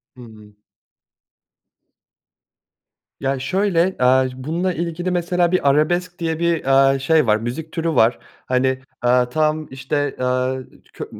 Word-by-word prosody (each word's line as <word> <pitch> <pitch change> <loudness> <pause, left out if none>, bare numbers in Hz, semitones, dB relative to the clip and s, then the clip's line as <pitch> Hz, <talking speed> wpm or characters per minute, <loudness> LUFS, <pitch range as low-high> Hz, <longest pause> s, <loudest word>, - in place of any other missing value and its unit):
Hı 125 - -13
hı. 110 -3 -15 2.6
Ya 135 0 -1
şöyle, 185 +5 0
aaa, 130 +1 +4
bununla 165 +8 -2
ilgili 170 +2 -3
mesela 175 0 0
bir 180 -6 +2
arabesk 175 +5 0
diye 165 -1 -2
bir, 170 -3 0
aaa, 135 0 +4
şey 150 0 +2
var, 105 0 +4
müzik 125 +8 -6
türü 165 -1 -2
var. 115 +2 +3 0.3
Hani, 130 +1 0 0.2
aaa, 125 0 +2
tam 155 +2 0
işte, 140 +2 -2
aaa, 130 +1 0 0.4
ço - - -6
145 Hz, 130 wpm, -20 LUFS, 130-170 Hz, 2.6 s, aaa